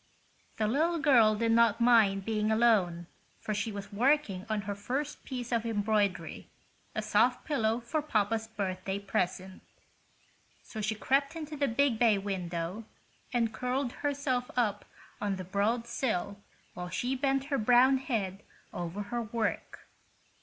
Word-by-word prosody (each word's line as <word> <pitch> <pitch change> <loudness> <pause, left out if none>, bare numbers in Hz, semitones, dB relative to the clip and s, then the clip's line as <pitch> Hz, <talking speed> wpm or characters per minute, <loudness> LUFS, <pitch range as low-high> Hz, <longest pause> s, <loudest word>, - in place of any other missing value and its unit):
The 220 - +1
little 315 +10 +1
girl 245 -8 +5
did 230 +1 +1
not 230 -1 +4
mind 220 -5 +4
being 215 -1 0
alone, 205 -7 +3 0.3
for 215 - -3
she 210 +2 -2
was 200 0 -8
working 230 -4 +1
on 215 -1 0
her 205 +1 -4
first 260 +9 -4
piece 250 -2 -6
of 230 -2 +1
embroidery—a 210 -3 -3
sofa - - +3
pillow 230 -6 0
for 240 +7 -2
papa's 225 -5 0
birthday 190 -3 -3
present. 190 -1 -3 1.0
So 220 - -7
she 210 +1 -1
crept 275 +7 +1
into 310 -2 -6
the 280 -1 +1
big 245 -1 +1
bay 225 -4 +4
window 185 0 -4 0.5
and 230 -2 0
curled 250 +2 -1
herself 275 -3 -2
up 210 -4 0 0.4
on 205 -1 0
the 185 - -6
broad 205 +6 0
sill 205 -5 -2 0.3
while 180 0 -6
she 245 +7 -1
bent 270 0 0
her 275 - +2
brown 250 +4 +5
head 205 -7 -2 0.3
over 175 +4 -4
her 240 +4 -3
work. 230 0 -3
225 Hz, 145 wpm, -30 LUFS, 200-250 Hz, 1.0 s, girl